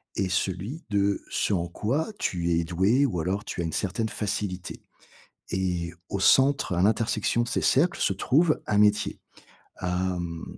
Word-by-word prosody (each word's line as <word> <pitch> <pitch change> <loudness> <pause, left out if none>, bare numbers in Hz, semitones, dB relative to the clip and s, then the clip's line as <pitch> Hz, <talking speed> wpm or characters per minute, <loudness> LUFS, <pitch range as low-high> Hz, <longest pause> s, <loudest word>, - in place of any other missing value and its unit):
et 95 -1 0
celui 95 - -2
de 100 -1 +1
ce - - 0
en 85 -2 0
quoi 130 - -2
tu 85 -1 -1
es 85 0 +2
doué, 95 +11 +2
ou 95 -11 -1
alors 95 +6 -2
tu - - -4
as - - -2
une 80 - -4
certaine 110 +4 -1
facilité, 100 -4 -4 0.7
et 90 -3 -1 0.2
au 100 - -2
centre, 135 +2 +4
à 85 - +1
l'intersection 110 +2 +1
de - - -5
ces - - -1
cercles 165 +7 +2
se - - +2
trouve 150 - +2
un 105 - 0
métier. 105 0 +3 0.6
Hem, 90 -2 -2
100 Hz, 165 wpm, -26 LUFS, 90-110 Hz, 0.7 s, centre